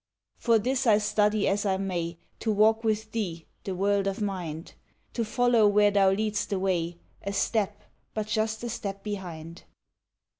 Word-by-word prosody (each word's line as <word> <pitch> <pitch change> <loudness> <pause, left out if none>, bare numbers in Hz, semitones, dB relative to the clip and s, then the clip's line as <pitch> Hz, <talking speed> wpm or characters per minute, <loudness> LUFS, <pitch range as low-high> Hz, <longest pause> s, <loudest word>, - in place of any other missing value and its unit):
For 230 -2 +4
this 255 +4 0
I 215 -2 +6
study 210 0 +2
as 200 +1 +1
I 195 -2 +1
may 175 -3 -3 0.2
To 220 - 0
walk 220 +2 +4
with 220 0 -1
thee, 175 -8 -3 0.2
the 190 - -3
world 200 +1 +1
of 195 +1 -2
mind, 180 -6 -4 0.4
To 235 - 0
follow 235 -1 +3
where 205 0 +4
thou 200 -1 +4
lead'st 210 +1 -1
the 200 - 0
way, 175 -3 -1 0.2
A 200 - -3
step, 205 0 0 0.3
but 215 -1 -1
just 220 +1 -1
a 240 - -3
step 200 -3 -5
behind. 175 -5 -6
205 Hz, 165 wpm, -27 LUFS, 190-220 Hz, 0.4 s, I